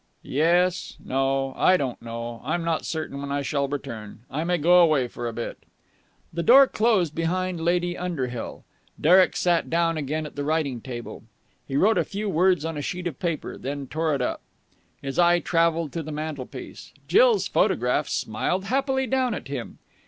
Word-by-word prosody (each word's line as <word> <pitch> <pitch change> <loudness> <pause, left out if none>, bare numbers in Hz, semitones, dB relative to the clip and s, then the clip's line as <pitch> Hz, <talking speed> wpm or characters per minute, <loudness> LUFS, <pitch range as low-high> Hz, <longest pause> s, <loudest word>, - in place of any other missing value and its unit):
"Yes. 175 +5 +1
No. 135 0 0
I 185 - +4
don't 130 -6 -3
know. 115 0 -6
I'm 160 +6 -1
not 165 -1 -1
certain 155 -4 -4
when 140 0 -5
I 140 0 -1
shall 140 0 0
return. 115 -7 -6
I 150 +4 -2
may 175 +1 +1
go 175 +3 +5
away 155 -7 +4
for 120 0 -6
a - - -2
bit." 115 +1 -5 0.7
The 170 - -1
door 265 +9 +8
closed 215 - +1
behind 175 +1 -1
Lady 175 +1 +1
Underhill. 135 -10 -4 0.4
Derek 180 +4 +5
sat 175 -2 +1
down 165 -1 +1
again 155 +1 -2
at 150 - -9
the 145 - -3
writing 145 -5 -1
table. 120 -2 -7 0.5
He 135 - -4
wrote 215 +8 +4
a - - +2
few 210 +1 -4
words 180 -2 +2
on 165 -1 -3
a - - -3
sheet 180 +5 -4
of 160 -7 -4
paper, 170 -4 -3
then 140 +1 -4
tore 155 +3 -1
it 130 - -1
up. - - -2 0.6
His 135 +3 -3
eye 175 0 +5
travelled 165 -3 +1
to 165 - -2
the 155 0 -7
mantelpiece. 150 -3 -7
Jill's 465 0 +4
photograph - - +1
smiled 190 +2 -1
happily 265 +3 0
down 255 -2 0
at 135 - -8
him. 135 -4 -5
160 Hz, 180 wpm, -25 LUFS, 140-180 Hz, 0.7 s, door